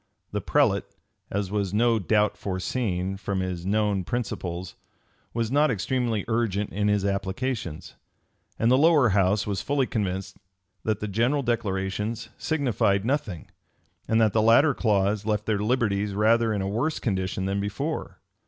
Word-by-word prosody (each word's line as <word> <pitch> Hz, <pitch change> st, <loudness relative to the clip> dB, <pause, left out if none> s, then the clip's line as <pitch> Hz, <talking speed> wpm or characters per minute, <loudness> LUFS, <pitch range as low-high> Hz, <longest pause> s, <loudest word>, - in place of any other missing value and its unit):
The -, -, -2 dB
prelate, -, -, +2 dB, 0.4 s
as 100 Hz, -1 st, -2 dB
was 100 Hz, -2 st, -1 dB
no 115 Hz, 0 st, +3 dB
doubt 105 Hz, +1 st, +2 dB
foreseen, 95 Hz, -1 st, -2 dB
from 100 Hz, -1 st, -3 dB
his 90 Hz, -1 st, -4 dB
known 105 Hz, -2 st, +1 dB
principles, 90 Hz, -5 st, -4 dB, 0.6 s
was 115 Hz, 0 st, -2 dB
not 150 Hz, +2 st, +4 dB
extremely 115 Hz, 0 st, -1 dB
urgent 110 Hz, -3 st, 0 dB
in 105 Hz, +1 st, 0 dB
his 105 Hz, -1 st, +2 dB
applications; 100 Hz, -, -3 dB, 0.6 s
and 115 Hz, +2 st, +2 dB
the 130 Hz, -, +5 dB
lower 150 Hz, -5 st, +5 dB
house 100 Hz, +1 st, +2 dB
was 100 Hz, -2 st, -2 dB
fully 140 Hz, -2 st, +1 dB
convinced 95 Hz, -5 st, -3 dB, 0.5 s
that 110 Hz, -1 st, -1 dB
the 105 Hz, -, -2 dB
general 120 Hz, +8 st, +1 dB
declarations 105 Hz, -1 st, -2 dB
signified 115 Hz, -10 st, +1 dB
nothing, 120 Hz, -, -2 dB, 0.6 s
and 110 Hz, -, +2 dB
that 110 Hz, -3 st, +3 dB
the 110 Hz, -, +3 dB
latter 120 Hz, +7 st, +5 dB
clause 105 Hz, -3 st, +1 dB
left 105 Hz, -1 st, -1 dB
their 110 Hz, -2 st, 0 dB
liberties 105 Hz, -3 st, 0 dB
rather 115 Hz, +2 st, +3 dB
in 100 Hz, -2 st, -1 dB
a -, -, -2 dB
worse 120 Hz, +10 st, -1 dB
condition 95 Hz, -3 st, -2 dB
than 100 Hz, +1 st, -1 dB
before. 100 Hz, 0 st, -3 dB
105 Hz, 150 wpm, -26 LUFS, 95-115 Hz, 0.6 s, the